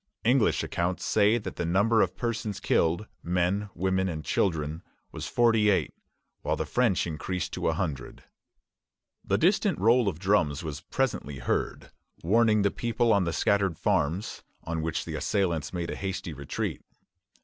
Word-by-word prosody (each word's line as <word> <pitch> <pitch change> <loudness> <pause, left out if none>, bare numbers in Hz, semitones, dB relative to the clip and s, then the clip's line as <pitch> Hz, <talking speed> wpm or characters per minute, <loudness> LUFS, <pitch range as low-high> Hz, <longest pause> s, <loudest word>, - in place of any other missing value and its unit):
English 125 0 +3
accounts 85 +1 -2
say 105 +2 +3
that 115 - -6
the - - -1
number 100 +6 +3
of - - 0
persons 115 -4 -3
killed 85 -1 +1 0.2
men, 90 +4 0
women, 95 +1 0
and 80 -3 -5
children 80 -3 0 0.3
was - - -6
forty 115 -3 +3
eight; 100 - +1 0.5
which - - -1
the - - -2
French 120 -7 +1
increase 85 +2 -3
to - - -3
a 80 - +2
hundred. 75 -7 -4 1.0
The 100 - +1
distant 190 - +2
roll 115 +1 +4
of 90 -6 -1
drums 85 -6 +1
was 75 -2 -5
presently 115 - -2
heard, - - -2 0.3
warning 110 +3 +3
the 100 - +2
people 120 0 +1
on 100 -3 +2
the 85 - -1
scattered 100 -4 +1
farms; 95 -1 -1 0.2
on 80 -1 -3
which 80 0 -2
the - - -6
assailants 85 -6 -1
made 85 -2 -3
a - - -4
hasty 95 -3 -4
retreat. 70 -1 -4
95 Hz, 160 wpm, -27 LUFS, 85-110 Hz, 1.0 s, roll